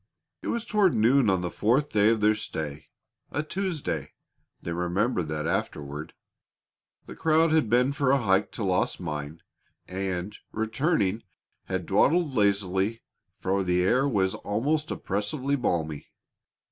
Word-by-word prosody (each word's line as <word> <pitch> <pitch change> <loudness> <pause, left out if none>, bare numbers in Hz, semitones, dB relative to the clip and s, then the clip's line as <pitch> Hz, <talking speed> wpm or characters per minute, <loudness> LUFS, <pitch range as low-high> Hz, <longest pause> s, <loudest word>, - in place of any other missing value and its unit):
It - - -7
was 235 -1 -1
toward 210 -6 +3
noon 120 +2 +4
on 95 -2 +2
the 90 - -3
fourth 130 +7 +1
day 105 0 +4
of 115 -1 +1
their 105 +1 +5
stay 80 -8 -5 0.4
a 145 - -2
Tuesday; 180 -1 -3 0.5
they 85 - -4
remembered 90 +2 0
that 75 0 -3
afterward. 75 -1 -3 0.9
The - - -9
crowd 160 0 +3
had 155 -8 +3
been 125 +4 +3
for 140 -2 +1
a 140 - +5
hike 100 -5 +2
to 115 - -4
Lost 95 -2 0
Mine, 75 -1 -5 0.4
and, 95 +1 -3 0.2
returning, 110 - 0 0.4
had 95 -2 -3
dawdled 145 - +3
lazily, 100 0 +1 0.3
for 95 +1 0
the 90 0 +2
air 130 +9 +3
was 95 -6 +1
almost 145 +9 -1
oppressively 130 +8 -1
balmy. 80 - -2
105 Hz, 140 wpm, -27 LUFS, 90-135 Hz, 0.9 s, their